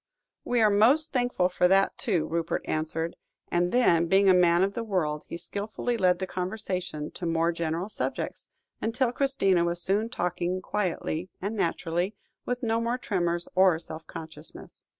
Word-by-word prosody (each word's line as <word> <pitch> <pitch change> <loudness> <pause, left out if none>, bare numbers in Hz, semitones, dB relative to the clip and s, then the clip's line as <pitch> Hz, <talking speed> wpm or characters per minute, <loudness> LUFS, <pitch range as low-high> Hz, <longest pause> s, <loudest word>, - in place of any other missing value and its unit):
"We 245 -1 +1
are 215 -1 +5
most 255 +10 +4
thankful 245 -8 +2
for 180 0 +2
that, 195 +1 +3
too," 180 -9 0
Rupert 165 +1 -2
answered; 160 +1 -2 0.3
and 175 +1 +1
then, 170 -9 +4
being 195 +2 +4
a - - +7
man 175 0 +4
of 195 +1 0
the 235 - -3
world, 160 -8 -1
he - - -5
skilfully 215 +6 -3
led 185 -5 +3
the 190 - -3
conversation 180 -5 -4
to 175 - -5
more 165 +1 +2
general 170 +2 -2
subjects, 215 - -4 0.3
until 240 +2 0
Christina 245 -10 +2
was 170 0 -1
soon 205 +5 0
talking 180 -3 -2
quietly 180 -3 -2
and 205 +4 -3
naturally, 175 +1 -1 0.3
with 245 +1 -2
no 225 0 +1
more 235 +2 0
tremors 175 -7 -1
or 185 -3 +5
self 160 -1 -9
consciousness. 160 -1 -10
185 Hz, 165 wpm, -27 LUFS, 170-215 Hz, 0.3 s, a